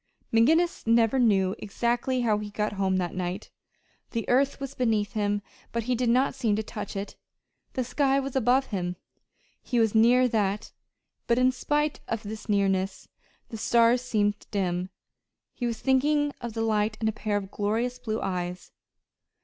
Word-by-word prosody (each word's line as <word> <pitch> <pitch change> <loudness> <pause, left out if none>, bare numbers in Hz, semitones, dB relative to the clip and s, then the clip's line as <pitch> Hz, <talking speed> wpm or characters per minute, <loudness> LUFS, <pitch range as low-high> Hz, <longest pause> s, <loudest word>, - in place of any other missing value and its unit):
McGinnis 320 +7 +3
never 230 +2 +4
knew 195 -6 +3
exactly 240 +4 -1
how 215 -3 +2
he 210 0 -6
got 210 0 -2
home 190 -1 +1
that 180 -2 -2
night. 180 +2 -4 0.6
The 230 -2 -3
earth 275 +3 +2
was 275 0 -5
beneath 220 -6 0
him, 205 -2 0 0.3
but 235 0 -2
he 250 +3 0
did 245 0 +1
not 255 +3 +3
seem 230 -5 0
to 220 - -1
touch 210 -1 -7
it. 200 +1 -5 0.6
The 260 - -1
sky 275 +2 +1
was 275 -1 -5
above 260 +1 +3
him 180 -2 -2 0.7
he 245 - -1
was 225 -2 +3
nearer 240 +3 +5
that. 210 -2 -1 0.6
But, 235 - +3
in 255 +1 +4
spite 295 +3 -1
of 225 0 -3
this 215 +1 -8
nearness, 195 -2 0 0.4
the 225 - -6
stars 235 +2 +3
seemed 210 -4 -1
dim 185 -2 -1 0.6
he 245 - -3
was 230 -2 -3
thinking 290 +2 +2
of 235 -2 -5
the 225 0 -1
light 215 0 +1
in 220 - 0
a - - +2
pair 215 -1 -2
of 195 -1 -6
glorious 230 +5 -1
blue 220 -3 -3
eyes. 180 -1 -4
225 Hz, 170 wpm, -27 LUFS, 205-250 Hz, 0.7 s, nearer